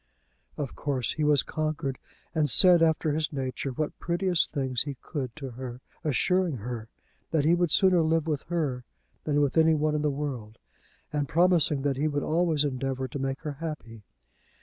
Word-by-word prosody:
Of 140 Hz, -4 st, -4 dB
course 135 Hz, -4 st, -1 dB
he 155 Hz, -, -2 dB
was 150 Hz, -2 st, +4 dB
conquered, 155 Hz, -3 st, -3 dB, 0.3 s
and 155 Hz, -3 st, +1 dB
said, 175 Hz, +8 st, +7 dB
after 160 Hz, -1 st, +2 dB
his 155 Hz, +1 st, -1 dB
nature, 135 Hz, -1 st, -3 dB
what 150 Hz, +4 st, -4 dB
prettiest 175 Hz, 0 st, +1 dB
things 130 Hz, -4 st, -1 dB
he 145 Hz, -2 st, -3 dB
could 130 Hz, -6 st, -5 dB
to 135 Hz, -4 st, -7 dB
her, 125 Hz, 0 st, -7 dB, 0.2 s
assuring 170 Hz, +2 st, +1 dB
her 115 Hz, 0 st, -6 dB, 0.4 s
that 155 Hz, -3 st, +1 dB
he 165 Hz, -, +5 dB
would 175 Hz, -1 st, +2 dB
sooner 185 Hz, +1 st, +4 dB
live 160 Hz, 0 st, +1 dB
with 150 Hz, -4 st, -1 dB
her 145 Hz, -8 st, -1 dB, 0.4 s
than 145 Hz, -1 st, +2 dB
with 145 Hz, +2 st, 0 dB
any 160 Hz, 0 st, +5 dB
one 155 Hz, 0 st, 0 dB
in 150 Hz, -, 0 dB
the 150 Hz, -, +1 dB
world, 135 Hz, -7 st, -5 dB, 0.6 s
and 145 Hz, -2 st, -1 dB
promising 165 Hz, -4 st, +3 dB
that 140 Hz, -2 st, 0 dB
he 150 Hz, +3 st, +1 dB
would 145 Hz, -1 st, -1 dB
always 160 Hz, -2 st, +1 dB
endeavour 130 Hz, -1 st, -2 dB
to 140 Hz, -, -5 dB
make 135 Hz, 0 st, -3 dB
her 145 Hz, -3 st, -5 dB
happy. 135 Hz, -9 st, -6 dB
150 Hz, 180 wpm, -27 LUFS, 135-160 Hz, 0.6 s, said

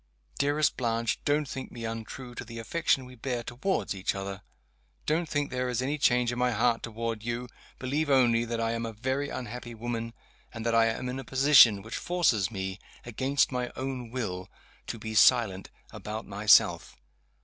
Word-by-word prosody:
Dearest 145 Hz, +1 st, +2 dB
Blanche! 115 Hz, -2 st, 0 dB
don't 145 Hz, 0 st, +1 dB
think 130 Hz, 0 st, -6 dB
me 115 Hz, -1 st, -6 dB
untrue 115 Hz, +3 st, -6 dB
to -, -, -6 dB
the 115 Hz, -1 st, -10 dB
affection 135 Hz, +2 st, 0 dB
we 125 Hz, -, -12 dB
bear 125 Hz, 0 st, -3 dB
toward 125 Hz, -, -2 dB
each 95 Hz, 0 st, -2 dB
other 95 Hz, 0 st, -5 dB, 0.6 s
don't 160 Hz, +1 st, 0 dB
think 145 Hz, -1 st, -1 dB
there 125 Hz, 0 st, -1 dB
is 125 Hz, -, -1 dB
any 140 Hz, +4 st, -1 dB
change 125 Hz, -2 st, +3 dB
in 120 Hz, -, -4 dB
my 125 Hz, 0 st, +3 dB
heart 115 Hz, 0 st, +1 dB
toward 115 Hz, -1 st, -4 dB
you 120 Hz, +2 st, -3 dB, 0.3 s
believe 145 Hz, +4 st, -1 dB
only 120 Hz, -4 st, +4 dB
that 120 Hz, 0 st, -3 dB
I 115 Hz, 0 st, 0 dB
am 115 Hz, 0 st, -2 dB
a 115 Hz, -1 st, -4 dB
very 130 Hz, +5 st, -2 dB
unhappy 120 Hz, 0 st, -6 dB
woman, 115 Hz, 0 st, -4 dB, 0.4 s
and 110 Hz, -1 st, -7 dB
that 115 Hz, -, +1 dB
I 115 Hz, 0 st, +5 dB
am 115 Hz, +3 st, -2 dB
in 125 Hz, +1 st, -4 dB
a -, -, -6 dB
position 130 Hz, -6 st, +6 dB
which 110 Hz, -, -5 dB
forces 165 Hz, -, +1 dB
me, 95 Hz, -2 st, -5 dB, 0.3 s
against 130 Hz, +5 st, +1 dB
my 125 Hz, -1 st, -2 dB
own 130 Hz, -2 st, -4 dB
will, 95 Hz, -7 st, -4 dB, 0.4 s
to -, -, -4 dB
be 110 Hz, 0 st, -6 dB
silent 110 Hz, -4 st, +4 dB, 0.2 s
about 110 Hz, +2 st, -6 dB
myself. 100 Hz, -9 st, +3 dB
120 Hz, 180 wpm, -28 LUFS, 115-130 Hz, 0.6 s, position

